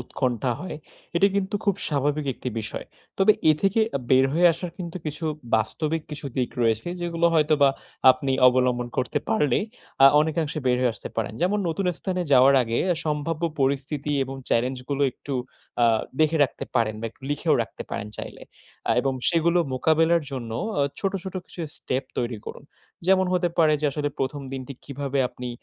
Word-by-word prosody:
উৎকণ্ঠা 125 0 -1
হয়, 180 -4 -5 0.4
এটি 195 - +5
কিন্তু 195 0 -1
খুব 200 -3 +3
স্বাভাবিক 145 0 0
একটি - - -5
বিষয়। 105 - -5 0.3
তবে 195 +2 +6 0.2
এ - - +7
থেকে 195 +3 +3 0.2
আ - - -1
বের 130 0 +6
হয়ে 175 +3 +5
আসার 170 +2 -5
কিন্তু 170 0 -5
কিছু 150 +2 -4 0.3
বাস্তবিক 155 +8 0
কিছু 150 -1 -6
দিক 125 -2 0
রয়েছে। 115 +6 +1
যেগুলো 170 -1 +1
হয়তোবা 150 -3 +4 0.4
আপনি 130 +1 0 0.2
অবলম্বন 125 -1 +1
করতে 125 - 0
পারলে 130 +6 +2 0.5
আ - - +12
অনেকাংশে 155 0 -1
বের 125 - +3
হয়ে 125 - +3
আসতে - - -8
পারেন। 110 -2 -1
যেমন 200 +4 +2
নতুন 180 +3 -1
স্থানে 185 -2 -2
যাওয়ার 135 +1 +7
আগে 115 0 -1
আ - - -1
সম্ভাব্য 150 +2 -2 0.2
পরিস্থিতি 140 +2 0
এবং 135 - -7 0.2
চেলেঞ্জ 125 +3 +1
গুলো 140 0 0
একটু 140 - -6 0.5
আ - - +7 0.4
দেখে 155 +1 +3
রাখতে 130 - -6
পারেন 115 -3 +2
বা 115 - -6
একটু 135 - -32
লিখেও 145 - +2
রাখতে - - -8
পারেন 105 - -4
চাইলে। - - -8 0.5
আ - - +3
এবং 135 -1 0 0.2
সেগুলো 170 +1 +3 0.2
মোকাবেলার 160 +4 +3
জন্য 120 -4 -5 0.3
আ - - +3 0.2
ছোট, 195 -1 0
ছোট 190 - -6
কিছু 175 - -10 0.2
স্টেপ 130 +1 -2
তৈরি 120 -2 -2
করুন। - - -8 0.4
যেমন 190 0 +4
হতে 180 -1 +2
পারে 155 -2 +5
যে 150 - +1
আসলে 145 0 -1
১ম 135 +2 -2
দিনটি 135 0 -5
কিভাবে 140 0 -3
আপনি 125 0 -7
145 Hz, 180 wpm, -25 LUFS, 130-165 Hz, 0.5 s, আ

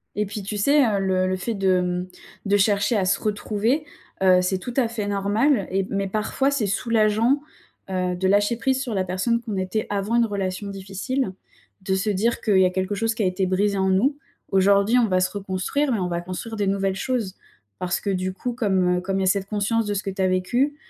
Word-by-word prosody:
Et 210 - 0
puis 205 +1 -6
tu 205 +2 -4
sais, 280 +6 +4
heu, 205 -3 +1
le 185 -1 +1
le 185 - 0
fait 230 +5 -3
de, 195 -2 +1
hem, 180 0 -1 0.4
de 200 +1 +3
chercher 205 +3 +2
à 190 - +1
se 195 +1 +1
retrouver, 215 +7 -1 0.4
heu, 185 -1 +6
c'est 185 +1 0
tout 245 +5 -6
à 250 -4 +3
fait 220 -3 -4
normal 205 +4 +1
et 195 0 0
mais 195 0 -1
parfois 220 +7 0
c'est 245 -7 0
soulageant, 225 +5 +2 0.5
heu, 180 -1 -1
de 190 +1 0
lâcher 205 +4 +2
prise 265 +1 0
sur 250 -4 -3
la 190 -2 0
personne 190 +6 0
qu'on 225 -3 -5
était 190 +3 -2
avant 205 +3 -1
une 235 -1 +4
relation 200 -2 -3
difficile. 195 +4 -3 0.5
De 190 0 0
se 200 +3 -1
dire 215 +4 0
qu'il 200 -4 +3
y 185 - +6
a 180 - +3
quelque 190 +2 -2
chose 225 +2 0
qui 220 - -1
a - - +2
été 185 +1 0
brisé 200 +2 +1
en 190 0 +1
nous. 245 +10 +2 0.3
Aujourd'hui 200 +4 +4
on 230 - +3
va 185 -1 +2
se 185 - +1
reconstruire 200 +9 -1
mais 215 - 0
on 180 - -1
va 170 0 -1
construire 185 +6 -6
des 205 - 0
nouvelles 195 -1 0
choses, 230 -5 -2 0.4
parce 180 0 -1
que, 200 - -3
du 185 -1 -1
coup 245 +5 -4
comme, 190 -6 +1
heu, - - -6
comme 195 +1 -2
il - - 0
y - - +1
a - - +1
cette 195 +1 +1
conscience 215 +2 0
de 205 - -1
ce 200 - -2
que 195 - -3
tu 190 - -4
as 185 - +3
vécu, 240 +11 +1
200 Hz, 240 wpm, -23 LUFS, 190-225 Hz, 0.5 s, heu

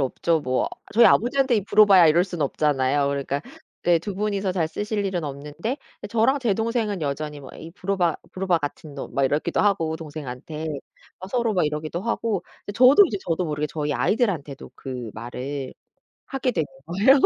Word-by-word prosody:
없죠. 160 +5 +1
뭐 130 -3 0 0.2
저희 235 +2 +7
아버지한테 250 +1 +3
"이 205 - -1
브로바야." 195 -4 +7
이럴 165 +3 +5
수는 175 -4 -2
없잖아요. 140 -1 +1
그러니까 140 0 -2 0.4
네 175 -1 +4
2 190 +4 -5
분이서 200 -1 -1
잘 170 -4 0
쓰실 210 +3 -2
일은 180 -4 -2
없는데 150 - -4 0.3
저랑 230 +5 +3
제 235 -5 +2
동생은 225 -2 -1
여전히 150 0 -3
뭐 135 - -11
"이 160 - -9
브로바, 185 -2 0 0.2
브로바 185 -2 +1
같은 145 0 -6
놈." 140 - -7
막 140 - +2
이렇기도 150 +5 +1
하고 165 -6 +1
동생한테. 155 -1 -7 0.5
막 185 +1 -9
서로 235 -2 +1
막 180 - +2
이러기도 155 +3 -3
하고 225 -4 -1 0.3
저도 255 - +8
이제 210 - -3
저도 175 +1 0
모르게 150 -1 -1
저희 150 -1 -2
아이들한테도 160 - -1
그 125 -4 -6
말을 130 +4 -5 0.6
하게 265 -1 -1
되는 160 -9 -1 0.2
거예요. 205 - +4
170 Hz, 370 characters per minute, -24 LUFS, 145-205 Hz, 0.6 s, 저도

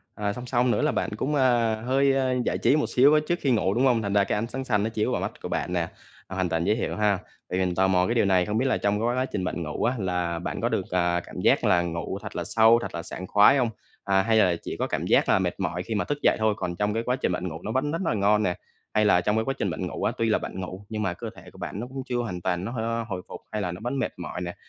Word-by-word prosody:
à, 105 -1 -2
song 125 +2 -7
song 125 0 +2
nữa - - +1
là 150 - +2
bạn - - -1
cũng, 145 +5 -1
à, 120 -4 +3
hơi, 135 +1 +3
a, 130 -1 +1
giải - - 0
trí - - +3
một 150 - +1
xíu 140 +4 +5
á 155 - +6
trước 175 +1 0
khi 135 - +2
ngủ, 100 -4 +2
đúng 125 +4 +2
hông? 120 -3 +3
Thành 100 -1 -2
ra 100 -1 +4
cái - - -1
ánh 115 - -2
sáng 130 +2 -5
xanh 105 -5 +1
nó 110 - 0
chiếu 110 -1 -1
vào - - -1
mắt - - -2
của - - -5
bạn 90 - -2
nè, 85 -1 0 0.4
à 95 - -7
hoàn 95 -2 0
toàn 80 0 0
dễ 105 - +3
hiểu 115 - -2
ha. 105 -2 +2 0.3
Tại 90 - -1
mình 90 -1 0
tò 95 +1 +3
mò 90 -1 +3
cái 120 - 0
điều 115 - +3
này, 95 -2 +3
không 105 +1 -1
biết 130 - +1
là 130 - +2
trong 100 +1 0
cái 115 - 0
quá 130 - +1
trình 100 -7 -4
bạn 90 -1 -3
ngủ 75 - -4
á 125 +2 +2
là 90 -3 -1
bạn 90 - -4
có 120 - +1
được, 110 -6 -1
à, 85 -1 +2
cảm - - -7
giác - - +3
là 85 - +4
ngủ 85 +2 -3
thật - - -8
là 85 - -2
sâu, 110 +5 +5
thật - - -6
là 85 - -4
sảng 90 +2 -7
khoái 105 +7 +6
hông? 125 -3 +2 0.3
À, 95 -1 +3
hay 110 +2 +2
là 90 -5 +4
chỉ - - -5
có - - -1
cảm - - -2
giác - - +3
là - - +4
mệt - - -2
mỏi 90 +1 -2
khi 110 - -4
mà - - 0
thức 145 - -2
dậy - - +5
thôi 110 -1 +2
còn 85 - -3
trong 105 +3 0
cái 115 - -1
quá 125 +2 0
trình 130 - -1
bạn 90 +1 -2
ngủ 80 -1 -6
nó 110 - -3
vẫn 135 +4 0
rất 165 +3 -2
là 120 - +1
ngon 105 +1 +3
nè? 90 -1 0 0.4
Hay 105 0 +3
là 90 -4 +5
trong 105 +4 +1
cái 110 - +1
quá 135 - 0
trình - - -1
bạn - - -3
ngủ - - -5
á, - - +2
tuy 115 -1 +1
là - - +3
bạn - - -6
ngủ 95 +2 -7
nhưng 110 -1 -3
mà 95 -3 0
cơ - - -6
thể - - -13
của - - -17
bạn 100 - -5
nó 120 - -4
cũng 130 0 -6
chưa 125 -2 -2
hoàn 95 -7 -3
toàn 90 +1 -1
nó 115 - -4
hôi 115 -1 -2
hồi 90 -3 -4
phục - - -9
hay 105 -1 -2
là 90 -3 -2
nó 90 - -7
vẫn 130 +2 -2
mệt - - -2
mỏi 90 0 -6
nè, 85 0 -5
105 Hz, 330 wpm, -26 LUFS, 90-120 Hz, 0.4 s, á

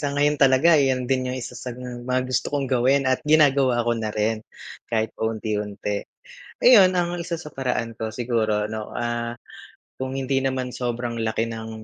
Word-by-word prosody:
sa 145 - -1
ngayon 145 0 +2
talaga 135 +5 +5
'yan 130 -2 +1
din 130 0 0
yung 125 - -3
isa 125 -1 -6
sa 125 -1 -7
mga 125 0 -3
gusto 130 0 -1
kong 140 -1 -1
gawin 130 +2 +2
at 130 -1 +1
ginagawa 140 -5 +3
ko 120 - +2
na 115 -2 -2
rin 110 +1 -1 0.5
kahit 110 -1 -1
paunti-unti. 105 -2 -3 0.6
Ayun, 195 -7 +7
ang 175 0 -1
isa 170 0 -3
sa 150 -2 -10
paraan 125 -3 -2
ko 110 0 -4
siguro 110 -2 0
ano, 110 0 -5
ah, 120 0 -2 0.6
kung 130 0 -3
hindi 135 0 0
naman 130 -1 -2
sobrang 120 -1 -3
laki 115 +1 -1
ng, 110 0 -6
125 Hz, 170 wpm, -23 LUFS, 115-135 Hz, 0.6 s, Ayun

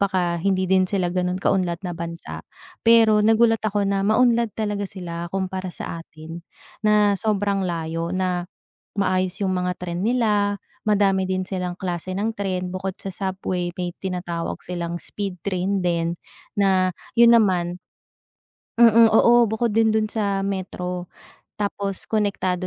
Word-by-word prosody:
baka 185 -3 +1
hindi 190 +1 +1
din 185 -1 +4
sila 180 -3 0
ganun 180 0 0
kaunlad 175 -4 0
na 180 - -2
bansa. 170 0 -6 0.4
Pero 225 -2 +6
nagulat 225 0 +4
ako 205 -1 +1
na 195 0 +1
maunlad 235 0 +3
talaga 205 -2 -2
sila 170 -3 -6
kumpara 190 0 -2
sa 165 - -6
atin 165 +2 -10 0.4
na 210 -1 +4
sobrang 200 -2 0
layo, 165 0 -3
na 180 -1 -1 0.5
maayos 185 -1 +1
yung 190 - +1
mga 180 0 0
tren 175 0 -3
nila, 210 -4 +2 0.3
madami 195 -2 +3
din 185 0 -1
silang 180 -2 -3
klase 180 0 -4
ng 205 +4 0
tren, 185 -2 -2
bukod 185 0 -4
sa 195 - -4
subway 185 -2 -2
may 180 -1 -2
tinatawag 180 -3 -4
silang 170 -1 -4
speed 195 -3 -5
train 190 0 -1
din 170 -1 0 0.4
na 190 -2 +3 0.3
yun 235 0 +8
naman 180 -5 +2 1.0
mm, 230 -1 +7
oo 235 +2 +6
bukod 220 +1 0
din 225 0 +4
dun 220 0 +1
sa 200 -3 0
metro 180 -2 -4 0.5
tapos 200 -1 -3
konektado 195 -4 0
190 Hz, 145 wpm, -23 LUFS, 180-205 Hz, 1.0 s, yun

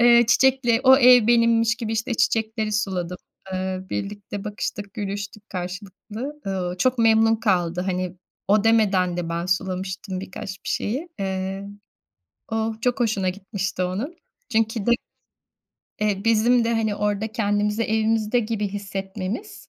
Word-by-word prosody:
Eee, 235 0 +7
çiçekle 245 -2 +4
o 260 0 +8
ev 250 -4 +7
benimmiş 230 0 +4
gibi, 230 -3 -4
işte, 225 +2 -1
çiçekleri 220 -1 0
suladım. 185 -4 -1 0.4
Eee, 185 0 -2
birlikte 205 0 -5
bakıştık, 205 -1 -5
gülüştük 205 0 -5
karşılıklı. 205 +9 -6
Eee, 180 -2 -2
çok 255 +5 +2
memnun 225 0 +5
kaldı. 180 -5 +1
Hani 185 -1 -2 0.3
o 210 +1 +4
demeden 200 -6 +3
de 175 -2 -3
ben 170 +1 -2
sulamıştım 185 0 -2
bir 195 - -8
kaç 190 - -6
bir - - -5
şeyi. 275 +11 -2
Eee, 190 0 -3 0.9
o 225 0 0
çok 245 +1 0
hoşuna 210 -5 +1
gitmişti 190 -1 -3
onun. 210 - -3 0.3
Çünkü 220 -2 0
de 240 - +3 1.1
eee, 205 -1 0
bizim 230 +2 +4
de, 230 - 0
hani, 220 -2 0
orada 210 +1 -1
kendimizi 210 -1 0
evimizde 220 +1 +1
gibi 215 -2 -2
hissetmemiz 195 - -5
210 Hz, 135 wpm, -23 LUFS, 190-225 Hz, 1.1 s, o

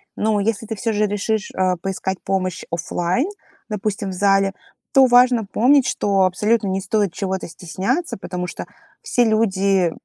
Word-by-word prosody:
Но 215 -1 +1
если 215 +1 -1
ты 220 0 -4
всё 225 +2 -2
же 210 0 +2
решишь, 205 +1 -2
а, 185 -1 +1
поискать 190 +1 -3
помощь 185 -2 -2
офлайн, 175 - -1 0.4
допустим, 205 -1 -3
в - - -5
зале, 195 +1 +2 0.4
то 270 -1 +7
важно 245 -2 +5
помнить, 255 +7 +3
что 200 -1 +1
абсолютно 205 +4 +2
не 190 0 -1
стоит 205 -2 0
чего-то 190 -1 -3
стесняться, 185 - -3
потому 180 -2 -5
что - - -6 0.4
все 245 - +2
люди 195 -5 +2
200 Hz, 155 wpm, -20 LUFS, 190-220 Hz, 0.4 s, то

